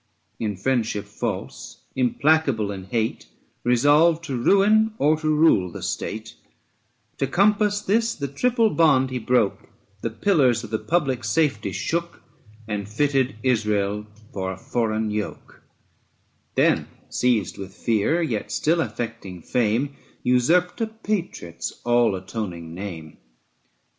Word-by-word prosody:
In 105 Hz, -4 st, -2 dB
friendship 110 Hz, -2 st, 0 dB
false, 65 Hz, -10 st, -5 dB
implacable 130 Hz, -4 st, +2 dB
in 95 Hz, -2 st, -7 dB
hate, 110 Hz, +3 st, -1 dB
6 -, -, -30 dB, 0.3 s
Resolved 145 Hz, +7 st, +4 dB
to 140 Hz, -5 st, -4 dB
ruin 210 Hz, -, +4 dB
or 150 Hz, +2 st, +3 dB
to 155 Hz, -, -3 dB
rule 155 Hz, -, +4 dB
the -, -, -8 dB
state; 110 Hz, 0 st, -4 dB, 0.9 s
To 135 Hz, -, +1 dB
compass 205 Hz, +5 st, +2 dB
this 230 Hz, +3 st, +1 dB
the 140 Hz, -, -3 dB
triple 230 Hz, -, +2 dB
bond 135 Hz, -6 st, +3 dB
he 130 Hz, -, -2 dB
broke 115 Hz, -3 st, 0 dB, 0.3 s
The 115 Hz, -, -1 dB
pillars 125 Hz, -, +2 dB
of 110 Hz, -, -9 dB
the 110 Hz, -, 0 dB
public 150 Hz, -7 st, 0 dB
saTety 110 Hz, -3 st, 0 dB
shook, 170 Hz, -, -3 dB, 0.4 s
And 105 Hz, -2 st, -4 dB
fitted 135 Hz, +2 st, +1 dB
Israel 105 Hz, -4 st, 0 dB, 0.3 s
for 95 Hz, -1 st, -3 dB
a 95 Hz, -, -7 dB
foreign 110 Hz, 0 st, -1 dB
yoke; 105 Hz, -1 st, -5 dB, 0.9 s
Then, -, -, +3 dB, 0.2 s
seized 115 Hz, -8 st, 0 dB
with 95 Hz, -1 st, -8 dB
fear, 115 Hz, +10 st, +1 dB
yet 115 Hz, -9 st, -3 dB
still 165 Hz, +2 st, +2 dB
affecting 115 Hz, -, -5 dB
fame, 125 Hz, +4 st, 0 dB, 0.3 s
Usurped 160 Hz, -, +2 dB
a 225 Hz, -, +1 dB
patriot's 205 Hz, -, -4 dB
all 120 Hz, -4 st, +3 dB
atoning 90 Hz, -4 st, -6 dB
name. 95 Hz, +4 st, -5 dB
ABSALOM 80 Hz, -3 st, -8 dB
AND 80 Hz, -, -16 dB
ACHITOPHEL. -, -, -36 dB
120 Hz, 135 wpm, -23 LUFS, 105-160 Hz, 0.9 s, Resolved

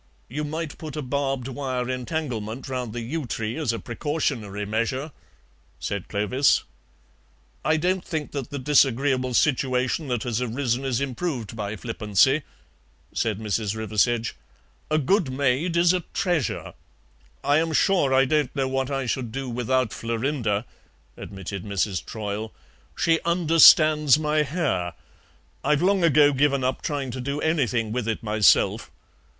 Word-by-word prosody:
"You 150 Hz, +5 st, -3 dB
might 155 Hz, +1 st, -5 dB
put 155 Hz, -3 st, -7 dB
a 150 Hz, -, -3 dB
barbed 135 Hz, -1 st, -2 dB
wire 130 Hz, -2 st, -3 dB
entanglement 125 Hz, -3 st, -4 dB
round 125 Hz, -3 st, -3 dB
the 120 Hz, +2 st, -5 dB
yew 140 Hz, +4 st, -4 dB
tree 115 Hz, 0 st, -3 dB
as 155 Hz, -7 st, 0 dB
a 115 Hz, -, -3 dB
precautionary 120 Hz, -7 st, -3 dB
measure," 115 Hz, +8 st, -2 dB, 0.7 s
said 100 Hz, -2 st, -4 dB
Clovis. 110 Hz, +7 st, +2 dB, 1.0 s
"I 155 Hz, +2 st, +2 dB
don't 180 Hz, +3 st, 0 dB
think 155 Hz, -4 st, -4 dB
that 140 Hz, -3 st, -4 dB
the 145 Hz, -, -5 dB
disagreeable 130 Hz, -2 st, +2 dB
situation 130 Hz, +1 st, +1 dB
that 120 Hz, -4 st, -1 dB
has 120 Hz, -1 st, -2 dB
arisen 125 Hz, +1 st, -1 dB
is 130 Hz, -1 st, 0 dB
improved 130 Hz, -, -3 dB
by 105 Hz, -1 st, -4 dB
flippancy," 115 Hz, +5 st, +2 dB, 0.7 s
said 110 Hz, -3 st, 0 dB
Mrs. 105 Hz, -1 st, -2 dB
Riversedge; 110 Hz, +2 st, 0 dB, 0.6 s
"a 155 Hz, -, +2 dB
good 155 Hz, 0 st, +1 dB
maid 140 Hz, +6 st, 0 dB
is 170 Hz, +1 st, +5 dB
a 185 Hz, -, +1 dB, 0.2 s
treasure 175 Hz, -, -1 dB, 0.4 s
" -, -, -33 dB
"I -, -, +5 dB
am 165 Hz, 0 st, 0 dB
sure 160 Hz, -3 st, +3 dB
I 135 Hz, 0 st, +5 dB
don't 150 Hz, -1 st, 0 dB
know 135 Hz, -2 st, 0 dB
what 135 Hz, 0 st, -1 dB
I 135 Hz, -2 st, -2 dB
should 120 Hz, -1 st, -2 dB
do 135 Hz, +2 st, -4 dB
without 125 Hz, 0 st, 0 dB
Florinda," 115 Hz, -2 st, -1 dB, 0.5 s
admitted 95 Hz, -1 st, -7 dB
Mrs. 100 Hz, -2 st, -1 dB
Troyle; 110 Hz, 0 st, -5 dB, 0.5 s
"she 165 Hz, -1 st, +3 dB
understands 155 Hz, -3 st, +6 dB
my 155 Hz, 0 st, +1 dB
hair. 140 Hz, -, -1 dB, 0.7 s
I've 150 Hz, +3 st, +2 dB
long 195 Hz, -1 st, +3 dB
ago 150 Hz, -3 st, +5 dB
given 140 Hz, -1 st, +2 dB
up 130 Hz, +1 st, -1 dB
trying 140 Hz, -3 st, -3 dB
to 130 Hz, -, -5 dB
do 140 Hz, +3 st, -3 dB
anything 125 Hz, -9 st, 0 dB
with 120 Hz, -1 st, -2 dB
it 110 Hz, 0 st, -2 dB
myself. 105 Hz, -1 st, +3 dB
130 Hz, 145 wpm, -24 LUFS, 115-150 Hz, 1.0 s, understands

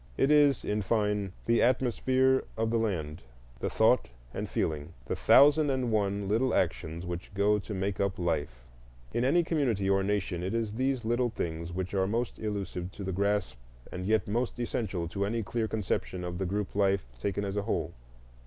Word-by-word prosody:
It 140 Hz, -, +3 dB
is, 145 Hz, -3 st, +4 dB
in 105 Hz, +1 st, 0 dB
fine, 105 Hz, -1 st, 0 dB
the 115 Hz, 0 st, +3 dB
atmosphere 130 Hz, +1 st, +2 dB
of 110 Hz, 0 st, 0 dB
the 115 Hz, -, +2 dB
land, 85 Hz, -8 st, -2 dB, 0.4 s
the -, -, -1 dB
thought -, -, +3 dB, 0.2 s
and -, -, -4 dB
feeling, 75 Hz, +1 st, -2 dB
the -, -, -2 dB
thousand 145 Hz, +1 st, +6 dB
and 130 Hz, -3 st, 0 dB
one 100 Hz, -2 st, 0 dB
little 115 Hz, +5 st, +2 dB
actions 80 Hz, +3 st, -1 dB
which 90 Hz, 0 st, -5 dB
go 105 Hz, +1 st, +3 dB
to 105 Hz, -, -6 dB
make 95 Hz, 0 st, -2 dB
up 100 Hz, -1 st, 0 dB
life. 75 Hz, -8 st, -2 dB, 0.5 s
In 120 Hz, -, +1 dB
any 170 Hz, +7 st, +4 dB
community 130 Hz, -, 0 dB
or 95 Hz, 0 st, +3 dB
nation 95 Hz, -3 st, -1 dB
it 95 Hz, +5 st, -2 dB
is 110 Hz, -2 st, -1 dB
these 130 Hz, 0 st, -1 dB
little 120 Hz, +2 st, +1 dB
things 85 Hz, -5 st, -4 dB
which 95 Hz, +2 st, -4 dB
are 95 Hz, -1 st, +2 dB
most 115 Hz, +3 st, -2 dB
elusive 100 Hz, -4 st, -4 dB
to 100 Hz, -, -7 dB
the 95 Hz, 0 st, -3 dB
grasp 100 Hz, -9 st, 0 dB, 0.3 s
and 90 Hz, +1 st, -5 dB
yet 110 Hz, -3 st, +2 dB
most 120 Hz, +4 st, -1 dB
essential 100 Hz, -7 st, -2 dB
to 100 Hz, +4 st, -2 dB
any 115 Hz, +3 st, -1 dB
clear 110 Hz, +2 st, -1 dB
conception 95 Hz, -3 st, -2 dB
of 90 Hz, 0 st, -4 dB
the 95 Hz, -, -1 dB
group 100 Hz, +2 st, -2 dB
life 100 Hz, -3 st, +2 dB
taken 100 Hz, +6 st, -2 dB
as 100 Hz, 0 st, -3 dB
a 105 Hz, -, +1 dB
whole. -, -, -2 dB
100 Hz, 190 wpm, -29 LUFS, 95-115 Hz, 0.5 s, thousand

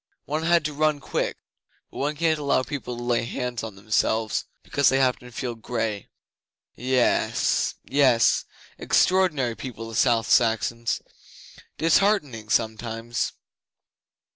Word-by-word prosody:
One 150 Hz, +2 st, -2 dB
had 170 Hz, -1 st, +3 dB
to 150 Hz, -, -2 dB
run 150 Hz, 0 st, +1 dB
quick, -, -, -2 dB, 0.5 s
but -, -, -11 dB
one 145 Hz, +2 st, -1 dB
can't 160 Hz, 0 st, +1 dB
allow 140 Hz, -3 st, +1 dB
people 125 Hz, -4 st, -5 dB
to 120 Hz, -, -6 dB
lay 120 Hz, -1 st, +1 dB
hands 125 Hz, 0 st, -3 dB
on 110 Hz, -3 st, -7 dB
themselves 110 Hz, +2 st, 0 dB, 0.2 s
because 140 Hz, 0 st, +2 dB
they 135 Hz, -, +2 dB
happen 125 Hz, -2 st, +1 dB
to -, -, -13 dB
feel 120 Hz, 0 st, -4 dB
grey. 115 Hz, -3 st, -3 dB, 0.6 s
Yes 125 Hz, 0 st, +1 dB
yess 130 Hz, -5 st, +3 dB, 0.3 s
Extraordinary 155 Hz, -11 st, +2 dB
people, 115 Hz, -3 st, -7 dB
the 115 Hz, -, -7 dB
South 115 Hz, -2 st, +3 dB
Saxons. 115 Hz, 0 st, +1 dB, 0.7 s
Disheartening, 160 Hz, -, +2 dB
sometimes.... 115 Hz, +1 st, -1 dB
125 Hz, 125 wpm, -25 LUFS, 115-145 Hz, 0.7 s, had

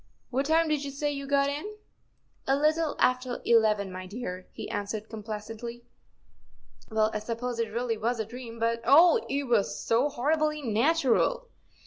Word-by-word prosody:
What 270 Hz, +2 st, 0 dB
time 325 Hz, +1 st, +3 dB
did 300 Hz, -2 st, 0 dB
you 280 Hz, -, -4 dB
say 290 Hz, +2 st, -2 dB
you 280 Hz, -1 st, -5 dB
got 280 Hz, 0 st, +3 dB
in? 300 Hz, +10 st, -4 dB, 0.4 s
" -, -, -42 dB, 0.3 s
"A 270 Hz, -, +4 dB
little 305 Hz, +2 st, +1 dB
after 255 Hz, -1 st, +1 dB
eleven, 215 Hz, -4 st, +3 dB
my 185 Hz, 0 st, -7 dB
dear," 185 Hz, -3 st, -6 dB
he -, -, -7 dB
answered, 210 Hz, +1 st, -4 dB
com¬ 220 Hz, -1 st, -8 dB
placently. 225 Hz, +3 st, -7 dB, 0.5 s
" -, -, -29 dB
Well, 220 Hz, -1 st, +2 dB
I 215 Hz, -, -1 dB
suppose 235 Hz, +2 st, -4 dB
it 225 Hz, -1 st, -1 dB
really 230 Hz, -1 st, -2 dB
was 235 Hz, +2 st, -1 dB
a 220 Hz, -, -1 dB
dream, 230 Hz, 0 st, -9 dB
but, 230 Hz, 0 st, 0 dB
oh! 315 Hz, +8 st, +6 dB
it 280 Hz, +1 st, 0 dB
was 235 Hz, -6 st, +1 dB
so 240 Hz, +6 st, +2 dB
horribly 305 Hz, +3 st, 0 dB
natural." 290 Hz, -, +2 dB
245 Hz, 175 wpm, -28 LUFS, 220-285 Hz, 0.5 s, oh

